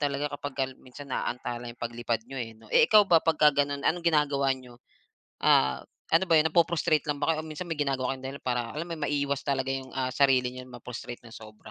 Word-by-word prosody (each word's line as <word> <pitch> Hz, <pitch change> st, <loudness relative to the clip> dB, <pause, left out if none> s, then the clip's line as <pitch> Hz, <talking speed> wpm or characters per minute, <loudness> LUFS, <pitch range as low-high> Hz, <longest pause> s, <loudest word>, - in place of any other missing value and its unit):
talaga 145 Hz, 0 st, -1 dB
kapag 135 Hz, -2 st, -4 dB
minsan 130 Hz, +1 st, -11 dB
naantala 120 Hz, 0 st, -3 dB
ang 120 Hz, -, -9 dB
paglipad 120 Hz, -1 st, -3 dB
niyo 135 Hz, -1 st, -6 dB
eh, 115 Hz, -1 st, -4 dB
'no? 110 Hz, 0 st, -18 dB
Eh, -, -, +6 dB
ikaw 215 Hz, -1 st, +7 dB
ba 165 Hz, -3 st, +6 dB
pagka 155 Hz, -2 st, +4 dB
gano'n, 140 Hz, 0 st, -5 dB
anong 175 Hz, +1 st, +1 dB
ginagawa 145 Hz, -3 st, +2 dB
niyo? 125 Hz, -2 st, -14 dB, 0.6 s
Ah, 65 Hz, 0 st, +4 dB, 0.3 s
ano 165 Hz, +3 st, +5 dB
ba 165 Hz, -, +3 dB
yun, 160 Hz, +1 st, +4 dB
napu-frustrate 160 Hz, -2 st, +2 dB
lang 145 Hz, -1 st, -1 dB
ba 155 Hz, -, +2 dB
kayo, 155 Hz, -, -3 dB
o -, -, -9 dB
minsan 155 Hz, +3 st, -6 dB
may 155 Hz, -, -3 dB
ginagawa 135 Hz, -3 st, 0 dB
kayong 130 Hz, 0 st, -12 dB
dahilan 140 Hz, +1 st, -7 dB
para 120 Hz, -2 st, -1 dB
alam 155 Hz, -, -3 dB
mo 170 Hz, -, -6 dB
yun, -, -, -10 dB
maiwas 140 Hz, -1 st, -1 dB
talaga 135 Hz, -1 st, 0 dB
yung, 135 Hz, -1 st, -5 dB
ah, 130 Hz, -1 st, 0 dB
sarili 130 Hz, -2 st, +3 dB
na 125 Hz, -, -8 dB
ma-frustrate 120 Hz, 0 st, -8 dB
ng 115 Hz, -, -12 dB
sobra. 110 Hz, -1 st, -12 dB
135 Hz, 225 wpm, -28 LUFS, 125-150 Hz, 0.6 s, ikaw